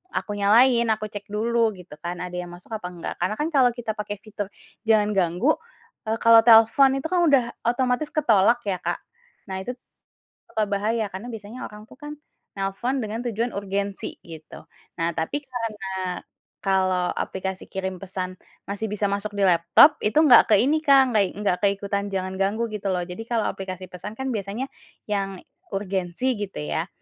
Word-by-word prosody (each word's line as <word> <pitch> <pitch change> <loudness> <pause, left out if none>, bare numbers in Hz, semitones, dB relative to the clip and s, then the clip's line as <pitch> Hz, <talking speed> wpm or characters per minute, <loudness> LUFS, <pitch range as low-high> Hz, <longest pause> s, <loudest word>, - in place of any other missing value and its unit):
aku - - -2
nyalain, 235 +4 +5
aku 215 -1 -1
cek 205 -1 -8
dulu 225 +1 +1
gitu 180 -5 -13
kan 175 +1 -5
ada 180 0 -6
yang 180 - -5
masuk 175 +5 -17
apa 215 -5 -4
enggak 175 -2 -6
karena 185 +4 0
kan 300 +7 -1
kalau 260 -5 +4
kita 235 -2 -3
pakai 210 -1 -5
fitur 205 -2 -5 0.4
jangan 210 -2 +4
ganggu, 190 - +1 0.5
eee, 220 - +1
kalau 230 0 +8
telepon 225 +4 +7
itu 270 +3 -2
kan 365 - +3
udah 275 -4 +5 0.2
otomatis 250 +4 +1
ketolak 235 -5 +4
ya, 195 -3 -2
Kak, - - -2 0.5
nah 190 -1 -4
itu 245 +7 -5 0.7
suka 215 - 0
bahaya 215 +3 0
karena 190 +6 -7
biasanya 220 +3 -8
orang 210 0 -12
itu 220 - -16
kan 295 0 -7 0.4
nelfon 200 +7 -2
dengan 215 +1 -4
tujuan 235 +1 -1
urgensi 200 0 -3
gitu. 160 -2 -11 0.4
Nah 165 +1 +1
tapi 165 - -2
karena 200 -8 -4 0.4
kalau 185 -2 +1
aplikasi 190 0 -4
kirim 190 -1 -4
pesan 185 -1 -5 0.3
masih 200 +2 -2
bisa 210 0 -2
masuk 200 +1 -3
di 200 - 0
laptop, 180 - +6
itu 210 - 0
enggak 280 -6 +7
ke - - +8
ini, 290 +5 +3
Kak, 275 -4 +5
nggak 215 -2 +4
i 185 - -3
enggak 200 -3 0
ke - - +7
ikutan 200 0 -3
jangan 190 0 -2
ganggu 210 +4 0
gitu 205 -2 -3
loh 180 - -1
jadi 180 +4 -8
kalau 230 -2 0
aplikasi 185 -1 -6
pesan 185 +3 -7
kan 265 +2 -3
biasanya 215 +3 -3 0.4
yang 195 -2 -2 0.3
urgensi 195 +5 -1
gitu 200 -2 -5
ya, 160 +2 -2
205 Hz, 180 wpm, -24 LUFS, 190-235 Hz, 0.7 s, kalau